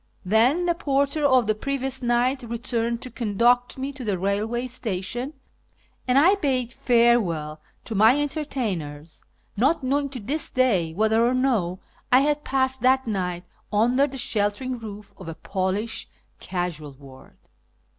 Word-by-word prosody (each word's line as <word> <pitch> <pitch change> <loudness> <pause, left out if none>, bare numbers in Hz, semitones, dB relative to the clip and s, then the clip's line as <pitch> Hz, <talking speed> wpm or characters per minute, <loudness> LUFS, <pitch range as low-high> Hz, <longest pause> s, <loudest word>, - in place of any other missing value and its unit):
Then 240 - +3
the 345 - +2
porter 280 -1 0
of 260 -3 +4
the 215 - +2
previous 265 +3 -3
night 245 +2 +1
returned 235 0 -2
to 255 - -5
conduct 240 +3 +1
me 270 +2 -3
to 270 -2 -9
the 205 -4 -1
railway 210 +6 -1
station, 240 +2 -4 0.7
and 250 +1 +3
I 335 +8 +6
bade 260 - -1
farewell 230 - +2 0.2
to 225 - -5
my 220 +7 +5
entertainers, 205 - -4 0.3
not 275 +8 +2
knowing 280 +2 0
to 260 -2 -6
this 275 +9 -3
day 210 - +2
whether 220 +5 +2
or 245 +2 +2
no 215 -9 0 0.3
I 255 +1 +7
had 295 +1 0
passed 265 -1 0
that 260 +1 +3
night 180 -5 -2 0.3
under 245 +6 +3
the 270 -1 -8
sheltering 235 +3 -1
roof 210 -2 -9
of 185 - -11
a 165 - -6
Polish 195 +5 -3 0.3
casual 170 -6 -4
ward. 135 -1 -16
240 Hz, 145 wpm, -24 LUFS, 200-265 Hz, 0.7 s, I